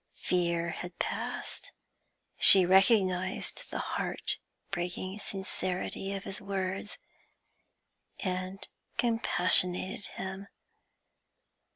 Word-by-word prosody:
Fear 170 -1 0
had 180 +1 -8
passed; - - -4 0.7
she 190 -2 +11
recognised 190 -1 +2
the - - -5
heart - - -1 0.3
breaking 185 +2 -4
sincerity 190 -1 -4
of 195 - -6
his 195 - -6
words, 195 0 -4 1.2
and 185 +1 -4 0.3
compassionated 190 -4 +2
him. 190 +1 -7
190 Hz, 75 wpm, -30 LUFS, 180-195 Hz, 1.2 s, she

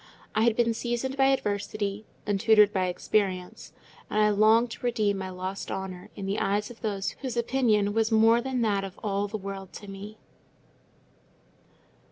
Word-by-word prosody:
I 215 - +1
had 235 -2 +3
been 230 -1 +2
seasoned 240 +3 -2
by 270 -1 +3
adversity, 205 -4 -1 0.2
and 205 -1 0
tutored 210 -1 +5
by 185 -2 +1
experience, 185 0 -1 0.4
and 215 - 0
I 210 0 +4
longed 220 +3 +4
to - - -9
redeem 215 -5 +1
my 190 0 -4
lost 185 +1 -5
honour 190 -2 -5
in 200 - -6
the 195 +2 -1
eyes 205 +3 0
of 235 - -14
those 200 -3 -2
whose 255 -3 -4
opinion 230 -4 +2
was 225 +1 +1
more 225 +1 +5
than 255 -1 -2
that 205 -3 +1
of 195 -1 -8
all 200 -1 0
the 215 +2 -4
world 195 -1 -7
to 205 - -9
me. 200 +2 -9
210 Hz, 175 wpm, -27 LUFS, 195-230 Hz, 0.4 s, tutored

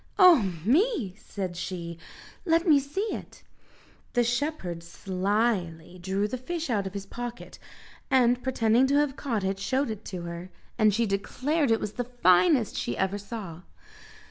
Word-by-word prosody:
"Oh 310 - +6
me!" 295 - +2
said 190 -4 -5
she, 170 -2 -5 0.4
"let 335 0 +2
me 300 -3 +7
see 385 +11 -3
it." - - -9 0.7
The 245 - +3
shepherd 240 - -2
slyly 185 -1 -1
drew 195 +3 0
the 255 +4 -4
fish 330 +2 -3
out 200 -4 0
of 190 - -8
his 200 -1 -4
pocket 240 +3 -7 0.5
and 250 -1 +4
pretending 245 0 +3
to 280 - +2
have 290 -2 +2
caught 230 -9 -2
it, 195 0 -1
showed 260 +5 0
it 215 -1 -7
her, 170 -1 -6 0.3
and 215 -2 +4
she 230 +3 +1
declared 255 +9 0
it 225 -1 +3
was 210 - -3
the 245 - -3 0.2
finest 220 - +4
she 120 - -2
ever 190 +1 0
saw. 195 -5 -7
220 Hz, 155 wpm, -27 LUFS, 190-265 Hz, 0.7 s, me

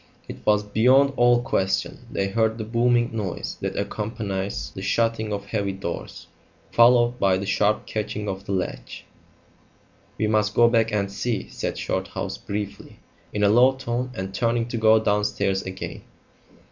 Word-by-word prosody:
It - - -7
was 105 -1 +4
beyond 130 +7 +4
all 120 -1 +4
question; 95 -5 -1
they 100 - -1
heard 110 +2 +1
the 110 - -4
booming 120 +1 +1
noise 100 -5 -4
that - - -3
accompanies 105 -3 -3
the 95 - -7
shutting 115 +1 0
of 100 -1 -3
heavy 100 -2 -2
doors, 95 -3 -6 0.5
followed 120 0 +5
by 95 -1 +3
the 100 - -4
sharp 105 +2 +1
catching 105 -1 -4
of 95 0 -4
the - - -3
latch. 95 -2 -4 1.1
"We 110 - 0
must 105 0 +1
go 120 - +6
back 115 -1 +2
and 100 -2 -1
see," 110 0 -3
said - - -4
Shorthouse - - -3
briefly, 100 0 -6 0.3
in 105 - -1
a 100 - +5
low 125 +5 +6
tone, 125 -1 -3
and 95 +1 -5
turning 115 +2 0
to 120 - -3
go 110 0 +5
downstairs 105 -2 0
again. 95 0 -7
105 Hz, 160 wpm, -24 LUFS, 100-115 Hz, 1.1 s, go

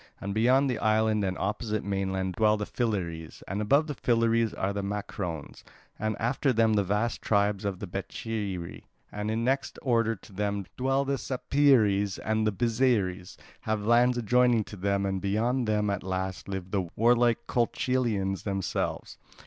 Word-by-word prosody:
And 100 0 -4
beyond 125 +6 +3
the 125 -3 -1
island 110 -1 +2
and 95 -1 -1
opposite 105 +2 -2
mainland 95 -1 -2
dwell 105 +3 +3
the 105 - -3
Philyres: 90 -10 -3
and 100 +3 -2
above 140 +8 +3
the 150 - -4
Philyres 115 -3 +2
are 95 +1 -2
the 100 - -2
Macrones, 100 -5 -5 0.4
and 110 -1 -1
after 130 +4 +1
them 115 -2 +3
the 100 -1 +3
vast 105 +5 -1
tribes 100 -1 +1
of 100 -2 -2
the 100 - -6
Becheiri. 95 -1 -5 0.3
And 110 +2 -2
next 135 +2 -1
in - - -12
order 115 -2 +2
to 100 - -17
them 100 0 -2
dwell 135 +2 +1
the 135 -1 -1
Sapeires, 120 -7 +2
and 110 0 +1
the - - +2
Byzeres 105 -5 0 0.2
have 110 -1 -1
the 105 - -6
lands 120 +1 +4
adjoining 120 0 +3
to 105 - -10
them, 100 +1 0
and 95 -1 -2
beyond 115 +5 0
them 105 -1 +1
at 100 - -2
last 95 0 -4
live 95 -1 -5
the 95 -4 -1
warlike 120 +1 +3
Colchians 115 -5 0
themselves. 95 -2 -3
105 Hz, 165 wpm, -28 LUFS, 100-120 Hz, 0.4 s, lands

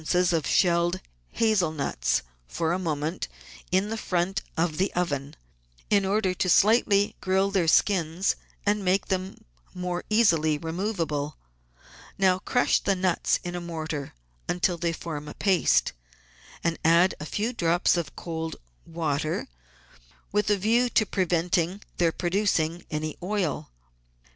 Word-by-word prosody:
of 160 -4 0
shelled 175 0 +2 0.3
hazel 215 -8 +2
nuts, 140 - -1 0.2
for 165 - -1
a 180 - -1
moment, 160 -1 -2 0.4
in 190 +3 +2
the 225 - -3
front 185 -1 -1 0.2
of 160 -1 0
the 190 +1 +1
oven, 145 -5 -2 0.6
in 200 -2 +4
order 195 -1 +1
to 185 0 -1
slightly 205 0 +4
grill 190 +1 +1
their 185 -4 +1
skins 175 +1 +2 0.3
and 205 0 +1
make 190 +1 +1
them 190 0 -2 0.7
easily 165 -9 +3
removable. 165 -4 -3 0.8
Now 185 -1 +3
crush 245 +5 +2
the 195 - +1
nuts 180 -2 +1
in 175 - -4
a 175 - -4
mortar 160 - -5 0.3
until 175 0 +1
they 170 0 0
form 155 -3 -6
a - - -8
paste, 190 -3 +2 0.7
and 165 -1 0
add 170 +3 +5
a 150 - -6
few 220 +9 -2
drops 175 -5 +2
of 170 -5 -3
cold 160 -1 -4 0.3
water 155 -2 -2 0.8
with 210 +1 +1
a 205 - +3
view 230 +5 +2
to 215 - +3
preventing 180 0 0 0.2
their 170 -2 +3
producing 175 -2 0
any 155 0 -3
oil. 185 - -2
175 Hz, 135 wpm, -26 LUFS, 160-195 Hz, 0.8 s, add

